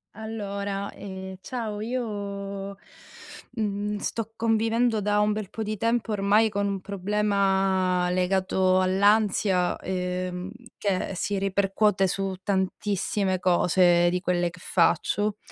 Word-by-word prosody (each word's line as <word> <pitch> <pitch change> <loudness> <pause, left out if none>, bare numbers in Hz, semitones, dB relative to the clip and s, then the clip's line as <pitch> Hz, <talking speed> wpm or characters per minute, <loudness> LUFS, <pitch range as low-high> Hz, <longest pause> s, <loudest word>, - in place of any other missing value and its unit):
Allora, 200 -2 -4
ehm, 190 -1 -8
ciao 220 -1 -4
io, 200 -4 -4 0.8
mhmm, 210 -2 -2
sto 225 +1 -4
convivendo 225 +1 +1
da 210 0 +1
un 210 0 +2
bel 210 -2 -3
po' 220 - -4
di 215 0 -3
tempo 230 +2 0
ormai 210 +2 +3
con 200 -1 -1
un 195 -1 -2
problema 195 -2 +1
legato 185 0 +2
all'ansia, 195 -1 +2
ehm, 180 0 -3 0.3
che 195 -1 -1
si 200 +2 -1
ripercuote 195 0 +2
su 195 0 -2
tantissime 190 0 -1
cose 175 -1 +4
di 180 +1 0
quelle 175 -1 0
che 180 +2 -14
faccio, 205 +4 +1
200 Hz, 115 wpm, -26 LUFS, 185-210 Hz, 0.8 s, cose